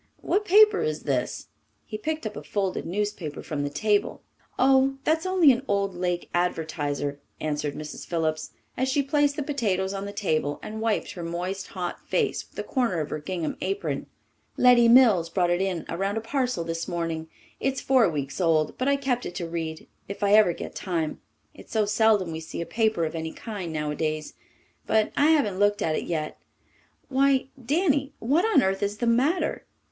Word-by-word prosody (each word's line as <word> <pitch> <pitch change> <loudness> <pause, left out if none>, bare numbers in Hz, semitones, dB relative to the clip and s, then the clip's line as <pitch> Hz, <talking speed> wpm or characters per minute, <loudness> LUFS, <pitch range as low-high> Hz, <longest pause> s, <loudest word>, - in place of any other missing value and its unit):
What 415 +2 0
paper 425 +2 +6
is 460 +1 -2
this?" - - -2 0.4
He 215 - -7
picked 310 +6 -3
up 215 - -4
a - - -6
folded 195 -3 -2
newspaper 195 -4 -3
from 150 -2 -3
the 145 - -1
table. 205 +7 0 0.3
"Oh, 270 +1 +4
that's 320 +5 +1
only 365 -6 +6
an 245 0 0
old 200 -1 0
Lake 175 0 -2
Advertiser," 150 -5 -1 0.2
answered 150 -1 -2
Mrs. 150 -1 -7
Phillips, 155 -2 -1 0.3
as 260 +1 0
she 280 +2 +2
placed 290 0 +2
the 295 - -2
potatoes 200 -10 -1
on 195 0 -4
the 200 - -5
table 155 -8 -1
and 220 +1 -6
wiped 225 -2 0
her 180 - -7
moist, 180 +3 -4
hot 180 -2 -5
face - - 0
with - - -29
the - - -3
corner 240 - 0
of 155 -1 -3
her 155 - -2
gingham 165 +1 -3
apron. 395 +1 -2 0.5
"Letty 245 -2 +6
Mills 230 -9 +6
brought 175 0 +1
it 175 +1 +1
in 185 -4 -2
around 195 +5 -2
a - - -1
parcel 250 -4 -1
this 165 0 -4
morning. 165 -2 -3 0.3
It's 270 0 -1
four 255 -7 +4
weeks 140 +1 -4
old, 160 -3 +2
but 255 - 0
I 280 - +4
kept 265 -3 -1
it 175 - -8
to 175 -3 -3
read 165 -1 -5 0.2
if 200 +1 -5
I 200 0 +3
ever 215 -4 +6
get - - -7
time. 165 -5 -3 0.3
It's - - -15
so 215 -2 +2
seldom 210 -4 +3
we 160 - -4
see 160 - -7
a 170 - -2
paper 220 -4 +1
of 155 - -4
any 160 -1 -4
kind 200 -7 -6
nowadays. 155 0 -2 0.5
But 220 -1 +2
I 290 - +4
haven't 275 -12 +2
looked 205 0 +2
at 155 - +1
it - - -2
yet. 155 -3 -3 0.7
Why, 270 0 +2
Danny, 285 0 +1
what 295 - +2
on 390 -12 +4
earth 195 0 0
is 205 +1 -1
the 240 - -1
matter?" 260 +10 +1
200 Hz, 190 wpm, -26 LUFS, 165-260 Hz, 0.7 s, paper